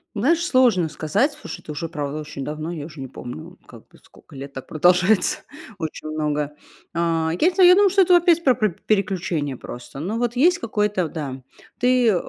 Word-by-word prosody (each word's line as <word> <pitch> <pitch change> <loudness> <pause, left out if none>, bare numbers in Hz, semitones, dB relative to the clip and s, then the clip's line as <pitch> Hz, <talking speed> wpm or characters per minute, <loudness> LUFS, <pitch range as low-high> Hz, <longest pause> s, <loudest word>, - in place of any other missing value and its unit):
Знаешь, 330 - +2
сложно 235 - +3
сказать. 195 - 0
Слушай, 300 +1 -9
ты 150 - -8
уже, 160 +3 -4
правда, 150 -2 -4
очень 150 -2 -7
давно, 155 +3 -5
я 150 -4 -6
уже 155 -3 -11
не 135 - -5
помню, 120 -9 -9
как - - -15
бы - - -21
скока - - -19
лет 140 +1 -8
так 135 - -8
продолжается, 180 +5 +3 0.4
очень 155 -2 -6
много. 150 -1 -2 0.4
А, 165 -1 0
я 345 - +5
те 370 +1 +5
я 360 +1 +8
думаю, 405 0 +5
что 385 +1 +3
это 360 -1 +6
опять 340 -1 +3
про 260 -4 +5
переключение 185 -8 -1
просто. 125 +2 -9
Ну 200 +9 -3
вот 240 0 -1
есть 345 +7 +4
какое-то 210 -5 -1
Да, 140 -5 -6 0.4
ты, 250 -1 +3
э 200 - +3
175 Hz, 190 wpm, -22 LUFS, 150-250 Hz, 0.4 s, я